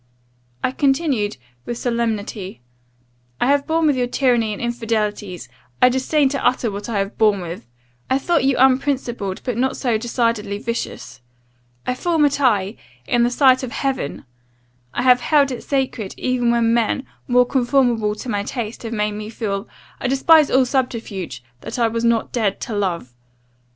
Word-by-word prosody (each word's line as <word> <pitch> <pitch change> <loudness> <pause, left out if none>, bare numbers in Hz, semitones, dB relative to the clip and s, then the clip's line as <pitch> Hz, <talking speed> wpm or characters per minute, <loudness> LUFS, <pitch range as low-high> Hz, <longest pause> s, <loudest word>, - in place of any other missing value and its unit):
"I - - +1
continued, 270 - +1 0.3
with 240 - -3
solemnity, 220 - -2 0.8
'I - - +2
have 280 +2 +2
borne 325 0 +2
with 295 -3 +3
your 250 -1 0
tyranny 245 -4 +2
and 205 - -5
infidelities. 215 -5 -2 0.3
I 250 - +6
disdain 265 +3 +2
to 275 0 -3
utter 245 -2 +1
what 200 +3 -6
I 220 - -1
have 195 +1 -3
borne 210 -3 +4
with. 170 -7 -7 0.4
I 260 - +3
thought 325 +2 +1
you 270 0 +3
unprincipled, 255 -6 +1
but 250 -4 -2
not 260 +1 0
so 235 -5 0
decidedly 230 -3 -1
vicious. 220 - -5 0.6
I 250 - 0
formed 320 +3 +2
a 285 - +3
tie, 225 -8 +1 0.3
in 240 - +2
the 240 - +3
sight 260 0 +4
of 255 -3 -5
heaven 270 - -3 0.7
I 245 - -2
have 250 -1 +5
held 285 -2 +3
it 250 - -5
sacred; 260 -7 -2
even 250 -2 0
when 235 -1 +3
men, 235 +3 +1 0.2
more 250 0 +4
conformable 245 -4 +1
to 215 - -8
my 205 -4 -1
taste, 225 +1 -5
have 230 -1 -5
made 210 -1 0
me 210 +1 -6
feel 210 -2 -3 0.3
I - - -1
despise 295 +4 +5
all 260 0 +4
subterfuge! 230 - -3 0.2
that - - -7
I 235 -1 +3
was 230 +1 -2
not 230 -1 +1
dead 215 -5 0
to 230 - -4
love. 175 -11 -2
240 Hz, 170 wpm, -20 LUFS, 210-260 Hz, 0.8 s, I